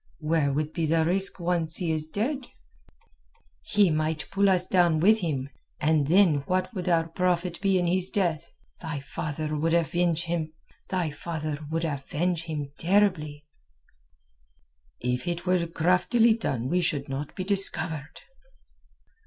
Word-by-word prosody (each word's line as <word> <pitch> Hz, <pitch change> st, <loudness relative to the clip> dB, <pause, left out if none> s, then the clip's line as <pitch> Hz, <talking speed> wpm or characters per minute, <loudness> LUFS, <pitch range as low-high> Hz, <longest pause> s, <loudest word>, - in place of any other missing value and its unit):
"Where 155 Hz, -2 st, +1 dB
would 150 Hz, +2 st, -2 dB
be 165 Hz, -2 st, -1 dB
the 160 Hz, +1 st, +2 dB
risk 190 Hz, +3 st, +1 dB
once 170 Hz, -2 st, 0 dB
he 175 Hz, -3 st, 0 dB
is 155 Hz, -1 st, -2 dB
dead?" 250 Hz, -, -2 dB, 1.1 s
"He 195 Hz, -, +3 dB
might 155 Hz, 0 st, -1 dB
pull 200 Hz, 0 st, +3 dB
us 185 Hz, -1 st, +2 dB
down 175 Hz, -4 st, +3 dB
with 215 Hz, +6 st, +5 dB
him, 145 Hz, -8 st, -2 dB, 0.3 s
and 150 Hz, -2 st, +2 dB
then 175 Hz, -2 st, +5 dB
what 185 Hz, +5 st, 0 dB
would 185 Hz, -3 st, -3 dB
our 165 Hz, -1 st, +2 dB
profit 175 Hz, +1 st, -1 dB
be 195 Hz, -1 st, +3 dB
in 175 Hz, -, +1 dB
his 185 Hz, +1 st, 0 dB
death? 170 Hz, -5 st, -1 dB, 0.3 s
Thy 160 Hz, -4 st, -4 dB
father 150 Hz, +2 st, -4 dB
would 165 Hz, +3 st, +1 dB
avenge 170 Hz, 0 st, +1 dB
him 165 Hz, -2 st, -2 dB, 0.4 s
terribly." 155 Hz, +1 st, -1 dB, 1.5 s
"If 125 Hz, +3 st, -2 dB
it 175 Hz, 0 st, -3 dB
were 180 Hz, -2 st, +1 dB
craftily 180 Hz, +8 st, +3 dB
done 130 Hz, -, -2 dB
we 180 Hz, +5 st, +1 dB
should 145 Hz, -5 st, -1 dB
not 140 Hz, +1 st, -5 dB
be 185 Hz, -, -3 dB
discovered." 165 Hz, -6 st, -2 dB
165 Hz, 130 wpm, -27 LUFS, 155-180 Hz, 1.5 s, with